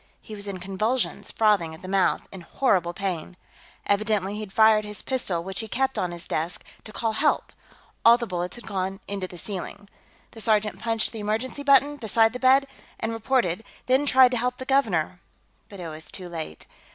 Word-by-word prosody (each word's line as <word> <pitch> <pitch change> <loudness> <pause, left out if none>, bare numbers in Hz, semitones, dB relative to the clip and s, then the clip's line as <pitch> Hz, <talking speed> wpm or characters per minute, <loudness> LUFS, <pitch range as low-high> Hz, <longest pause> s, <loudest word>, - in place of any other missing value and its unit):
He 220 - -11
was 205 -1 -5
in 195 -2 -4
convulsions, 215 +7 -1
frothing 200 -8 +2
at 160 - -16
the - - -7
mouth, 190 0 +1
in 190 - -9
horrible 175 -3 +1
pain. 180 -2 -4 0.5
Evidently 205 -1 +1
he'd 210 -2 -6
fired 220 0 +5
his 210 0 -5
pistol, 195 -10 -1
which 190 0 -3
he 220 - -3
kept 265 +5 0
on 180 - -1
his 170 -1 -7
desk, 165 +4 -2 0.2
to 215 - -9
call 225 +2 -1
help; 295 +8 +1 0.5
all 230 +1 +8
the 240 - -3
bullets 180 -3 -3
had 240 - -11
gone 190 0 -3
into 195 -2 -3
the 180 - -11
ceiling. 200 +2 -6 0.4
The 225 - -8
sergeant 215 -1 +1
punched 225 -1 0
the 225 - -7
emergency 220 +7 -2
button, 285 +1 +4
beside 225 -2 +3
the 250 - -5
bed, 265 +2 +5 0.3
and 225 - -2
reported, 225 -5 0 0.2
then 265 +3 +2
tried 260 -2 +6
to 250 - +1
help 250 +2 -1
the 260 - -6
governor, 195 - +1 0.5
but 200 - -10
it 175 - -5
was 155 0 -8
too 185 -2 -6
late. 160 - -6
210 Hz, 195 wpm, -25 LUFS, 185-235 Hz, 0.5 s, all